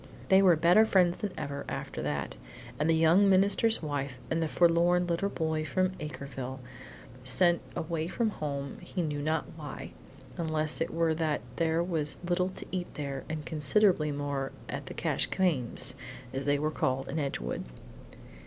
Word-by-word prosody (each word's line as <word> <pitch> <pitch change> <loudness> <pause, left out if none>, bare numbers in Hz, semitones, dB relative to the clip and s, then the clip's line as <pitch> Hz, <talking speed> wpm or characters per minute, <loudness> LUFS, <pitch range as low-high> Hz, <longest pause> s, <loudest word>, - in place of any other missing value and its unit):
They 190 -1 +7
were 185 -3 +6
better 175 +7 +6
friends 180 -5 +3
than 210 - -2
ever 140 -1 -4
after 135 0 -4
that, 70 -4 -3 0.5
the 165 +1 +3
young 165 +5 +5
minister's 200 +2 +3
wife 140 -3 -2 0.2
and 165 0 +1
the 160 - +1
forlorn 175 +2 +3
little 175 +3 0
boy 160 -4 -1
from 185 +5 +1
Acreville, 135 -3 -6 0.6
sent 175 +7 +4
away 160 0 -2
from 220 +4 0
home 140 -5 -4
he 180 - -3
knew 150 -2 -2
not 155 +2 0
why, 150 -3 -7 0.5
unless 155 -2 0
it - - 0
were 165 -1 +2
that 155 -2 0 0.2
there 165 0 +2
was 160 -4 -1
little 180 +1 +1
to 185 - -6
eat 180 -2 -3
there 140 -3 -4
and 155 -1 -4
considerably 160 +1 +2
more 140 -1 -2 0.2
at - - -5
the - - -7
Cash - - +1
Cames', 155 -11 0 0.4
as 135 0 -3
they 145 0 +3
were 155 +2 0
called 130 -2 -1
in 155 - -2
Edgewood. 135 - -3
160 Hz, 160 wpm, -30 LUFS, 145-175 Hz, 0.6 s, They